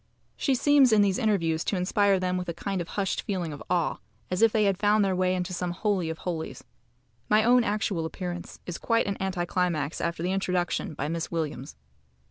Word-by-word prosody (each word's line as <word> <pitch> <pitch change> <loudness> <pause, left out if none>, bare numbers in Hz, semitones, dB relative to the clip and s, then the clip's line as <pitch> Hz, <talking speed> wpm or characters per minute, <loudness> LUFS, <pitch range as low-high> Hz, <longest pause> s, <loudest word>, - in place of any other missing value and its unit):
She 270 - +1
seems 275 -1 +5
in 210 -2 +5
these 195 -2 +1
interviews 170 -7 +1
to - - 0
inspire 195 +1 +2
them 180 0 -1
with 180 -1 -3
a 170 - -3
kind 195 +1 -3
of 170 - -6
hushed 195 -1 0
feeling 180 -6 -3
of 145 - -9
awe, 175 -3 +1 0.3
as 180 - 0
if 225 -1 +6
they 215 -1 +2
had 195 -2 +1
found 210 0 +3
their 190 -1 +1
way 185 0 +1
into 180 0 -3
some 180 0 -2
holy 185 -1 -1
of 160 - -4
holies. 165 -3 -4 0.7
My 215 +1 +5
own 245 +1 +5
actual 205 -5 -1
appearance 175 +1 -6
is 175 - -5
quite 230 -1 +1
an 200 - -2
anti 190 -2 -2
climax 170 -5 -1
after 170 0 -2
the 180 - 0
introduction 180 -4 -1
by 145 - -3
Miss 165 +1 -3
Williams. 150 - -4
185 Hz, 210 wpm, -27 LUFS, 170-205 Hz, 0.7 s, if